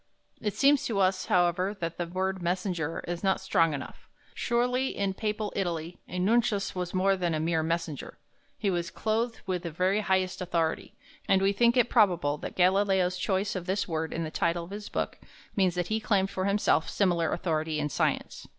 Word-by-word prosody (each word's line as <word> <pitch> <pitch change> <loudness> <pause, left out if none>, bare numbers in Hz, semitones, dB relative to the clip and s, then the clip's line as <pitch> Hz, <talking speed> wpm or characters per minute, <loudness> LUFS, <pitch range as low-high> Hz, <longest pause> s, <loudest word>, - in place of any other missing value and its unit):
It 210 -2 -2
seems 285 0 +4
to 225 - -2
us, 185 -1 +2
however, 180 +3 +2
that 165 -1 -3
the 175 - -1
word 190 +1 -2
"messenger" 175 -2 -2
is 175 +1 -4
not 190 -1 +2
strong 165 -1 +2
enough; 140 - -9 0.2
surely 250 +2 0
in 200 -1 0
Papal 210 +1 -3
Italy 170 -3 -3
a 180 - -6
nuncius 210 +1 +2
was 180 0 -4
more 195 +1 +3
than 175 -3 -1
a - - -1
mere 160 0 +1
messenger. 165 -2 -3 0.4
He 200 - 0
was 175 -1 -1
clothed 225 +2 -1
with 185 -2 -1
the 170 - -4
very 185 +5 +1
highest 190 -2 0
authority, 170 -3 -1 0.3
and 190 - +4
we 195 +1 +2
think 235 +4 +3
it 245 - +5
probable 175 - +3
that - - -6
Galileo's 185 0 +3
choice 195 +2 0
of 180 -1 -4
this 190 +2 0
word 160 -2 -2
in 165 - -2
the 155 - -5
title 170 +1 0
of 170 - -11
his 205 +1 -6
book - - -3 0.4
means 185 -3 +2
that 180 -1 -2
he 220 0 +1
claimed 200 -3 +1
for 185 - -2
himself 200 -5 +2
similar 175 -5 +1
authority 160 -2 -1
in 150 -1 0
science. - - -1
185 Hz, 195 wpm, -28 LUFS, 170-200 Hz, 0.4 s, it